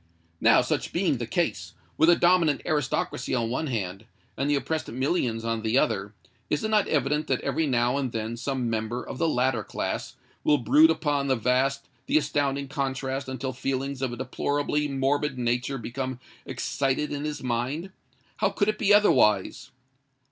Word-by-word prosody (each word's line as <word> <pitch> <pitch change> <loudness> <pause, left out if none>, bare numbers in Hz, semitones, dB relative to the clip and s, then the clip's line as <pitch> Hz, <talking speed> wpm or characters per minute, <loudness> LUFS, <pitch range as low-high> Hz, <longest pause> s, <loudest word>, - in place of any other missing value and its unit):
Now, - - +5
such - - -2
being - - +1
the - - -3
case,—with 160 +2 -1
a 175 - +7
dominant 170 -5 +3
aristocracy 135 -4 -1
on 115 -2 -1
one 155 +5 -1
hand, 100 -4 -3 0.3
and 140 +2 -1
the 145 - +3
oppressed 160 +3 -2
millions 125 -3 -1
on 115 -1 -1
the 110 +3 +1
other,—is 105 - -2
it 220 - -1
not 215 -2 +3
evident 150 +1 0
that - - 0
every 160 -1 0
now 125 0 +2
and 135 -3 -2
then 110 0 -3
some 130 +1 -2
member 115 +2 -2
of - - -7
the 165 - +2
latter 125 -5 +1
class 100 - -4 0.3
will 150 - +4
brood 150 +5 +5
upon 145 -3 0
the 130 - +3
vast, 130 +4 0 0.2
the - - +3
astounding 140 -2 0
contrast 135 -1 -3
until 130 0 -4
feelings 135 +1 -3
of 130 -2 -1
a 120 - -6
deplorably 145 +3 -1
morbid 140 0 0
nature 125 +2 -1
become 130 +2 -4 0.3
excited 140 +2 -1
in 145 0 -3
his 150 -2 -4
mind? 130 +9 -2 0.5
How - - +2
could 205 0 0
it 215 - -2
be 200 - +2
otherwise? 135 - +4
135 Hz, 170 wpm, -26 LUFS, 120-150 Hz, 0.5 s, a